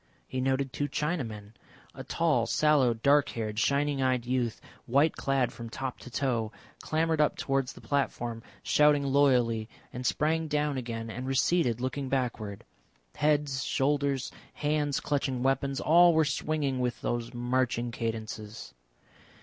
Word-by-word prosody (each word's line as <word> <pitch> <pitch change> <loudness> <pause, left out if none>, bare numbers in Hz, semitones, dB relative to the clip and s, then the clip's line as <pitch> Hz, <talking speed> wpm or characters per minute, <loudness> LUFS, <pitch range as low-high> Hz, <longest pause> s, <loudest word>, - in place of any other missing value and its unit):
He 130 - -3
noted 135 0 0
two 145 - -1
Chinamen. 130 -9 -3 0.4
A - - -8
tall, - - +1
sallow, 145 -6 +3
dark 140 +5 +3
haired, 110 -2 -3
shining 140 +2 +1
eyed 130 -2 +1
youth, 125 -2 -1 0.3
white 140 +6 +3
clad 135 -3 0
from 115 -1 -8
top 130 +2 -5
to - - -10
toe, 120 -4 -1 0.3
clambered 160 0 +1
up 150 - +2
towards 135 -2 -1
the - - -14
platform 120 -4 -1 0.2
shouting 150 -1 +4
loyally, 125 -5 +2 0.2
and 125 - -5
sprang 160 +5 +1
down 150 -1 0
again 115 -3 -4
and 125 +3 -5
receded, 135 -2 +2
looking 130 +2 -3
backward. 115 -6 -2 0.5
Heads, 145 -2 +1
shoulders, 140 -1 0 0.2
hands 145 -1 0
clutching 135 -4 -1
weapons, 135 +1 0
all 170 +1 +6
were 160 -1 +4
swinging 145 -2 -1
with 125 -1 -1
those 120 -1 -2
marching 120 -1 -1
cadences. 110 -2 -5
135 Hz, 140 wpm, -29 LUFS, 120-145 Hz, 0.5 s, all